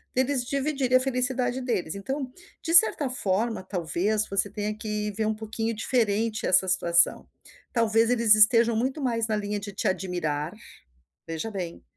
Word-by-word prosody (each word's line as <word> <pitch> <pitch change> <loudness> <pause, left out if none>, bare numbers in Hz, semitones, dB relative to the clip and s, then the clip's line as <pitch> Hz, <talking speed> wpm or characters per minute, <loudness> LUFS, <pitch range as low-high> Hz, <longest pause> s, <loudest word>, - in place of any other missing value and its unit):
deles 260 0 +1
dividir 275 -1 -1
a 255 - +7
felicidade 255 -1 -1
deles. 200 -10 -2
Então, 260 +6 -4 0.3
de 330 - -3
certa 330 -7 +5
forma, 220 -2 -1
talvez 190 +4 -1
você 195 +1 0
tenha 210 0 -4
que 210 -1 -3
ver 215 +2 -2
um 220 - 0
pouquinho 225 +1 -4
diferente 220 -1 0
essa 185 +1 +4
situação. 170 -2 +2 0.5
Talvez 225 -1 +2
eles 230 -3 +5
estejam 230 +2 +5
muito 260 +6 -2
mais 230 -3 0
na 215 - 0
linha 205 0 -3
de 205 0 -7
te 200 - -3
admirar, 175 -4 -2 0.7
veja 165 +7 -5
bem, 180 -5 -6
220 Hz, 155 wpm, -26 LUFS, 200-250 Hz, 0.7 s, a